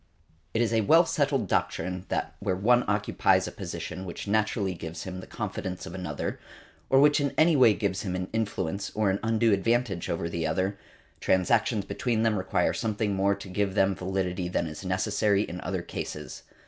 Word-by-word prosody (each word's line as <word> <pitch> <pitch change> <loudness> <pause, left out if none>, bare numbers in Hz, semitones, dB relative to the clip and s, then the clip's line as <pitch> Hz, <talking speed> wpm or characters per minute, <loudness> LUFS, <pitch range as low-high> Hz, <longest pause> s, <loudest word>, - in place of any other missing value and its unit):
It 115 - +3
is 115 - 0
a 110 - +3
well 165 - +6
settled 140 -8 0
doctrine 90 +2 -1
that - - -2
where 95 - -1
one 120 +6 +3
occupies 105 0 +2
a - - -5
position 95 - -6
which 90 +2 -7
naturally 105 -2 +1
gives 85 -1 -7
him 95 -1 -6
the 95 - -10
confidence 90 -1 -5
of 80 - -8
another, 90 -1 -4 0.5
or 135 - +5
which 145 +1 +5
in 140 -1 -1
any 160 0 +5
way 120 -6 +6
gives 100 -2 -1
him 90 -3 -3
an 90 0 -3
influence, 100 -3 -2
or 105 -2 +2
an 95 - -1
undue 115 0 +2
advantage 105 -2 0
over 85 0 -1
the 85 -1 -2
other, 95 +4 -1 0.4
transactions 105 +2 +2
between 120 -5 -1
them 110 -2 +2
require 95 - +1
something 110 -2 -1
more 100 +1 +2
to 100 - -10
give 95 +1 -1
them 95 -1 +3
validity 90 -1 -2
than 85 - 0
is 75 +3 -7
necessary 100 +2 +1
in 90 -3 -6
other 95 -2 -3
cases. - - -6
100 Hz, 185 wpm, -27 LUFS, 95-110 Hz, 0.5 s, well